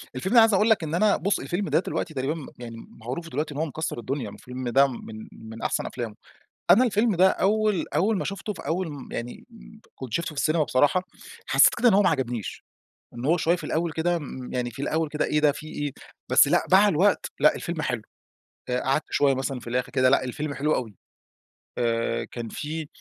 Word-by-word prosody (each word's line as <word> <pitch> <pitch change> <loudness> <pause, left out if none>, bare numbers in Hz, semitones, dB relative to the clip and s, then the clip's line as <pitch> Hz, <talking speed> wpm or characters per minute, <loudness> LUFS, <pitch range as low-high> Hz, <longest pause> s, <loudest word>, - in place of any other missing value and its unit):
الفيلم 185 - -2
ده 245 - +5
أنا - - +10
عايز 225 -1 +5
أقول 210 +4 +3
لك 220 -6 +3
إن 155 +1 -2
أنا 205 +3 +3
بُص 200 +1 0
الفيلم 175 +8 -3
ده - - +3
دلوقتي 170 -2 -3
تقريبًا 135 +2 -1
مم 155 - -8
يعني 115 -2 -8
معروف 130 +9 -7
دلوقتي 150 +3 -3
إن 145 - -5
هو 160 - +1
مكسر 160 -4 -4
الدنيا، 130 -1 -3
الفيلم 125 +4 -6
ده 135 +3 +5
من 110 -3 -8
من 110 0 -11
أحسن - - -1
أفلامه 115 -4 -5 0.6
أنا 240 +6 +7
الفيلم 220 -2 +2
ده 185 +2 +6
أوّل 210 -1 +1
أوّل 205 +3 +2
ما - - -2
شُفته 200 +2 -4
في 185 - -10
أوّل 175 +3 -1
م 140 -3 -9
يعني 120 +1 -6 0.5
كنت 130 -4 -8
شُفته 170 - -1
في 145 - -2
السينما 155 0 +2
بصراحة، 145 +7 +2 0.4
حسّيت - - +5
كده 240 +1 +5
إن 220 - +4
هو 205 - +5
ما 185 - +4
عجبنيش 120 - -3 0.5
إن 120 +1 -7
هو 165 +4 +4
شويّة 170 +2 +2
في - - -9
الأوّل 165 0 -1
كده 170 +2 0
م 130 -4 -8
يعني 125 -1 -1
في 130 +4 -8
الأوّل 160 +2 0
كده 150 +1 -1
إيه 150 - +1
ده 150 -1 +4
في 150 +2 -9
إيه، 145 -2 -4 0.4
بس - - +6
لأ، - - +3
مع 200 +2 +7
الوقت 195 +3 +2
لأ - - +5
الفيلم 170 -2 -4
حلو، 125 -6 -2 0.7
قعدت 135 +4 0
شويّة 140 -1 +3
مثلًا 130 -1 -3
في - - -15
الآخر 125 +1 -1
كده 130 -1 +3
لأ 135 -1 +3
الفيلم 145 +3 -4
حلو 150 +3 +1
أوي. 115 -5 -3 0.9
آآ، 115 -1 0
كان 115 -2 -7
في 155 0 -5
150 Hz, 220 wpm, -25 LUFS, 125-175 Hz, 0.9 s, أنا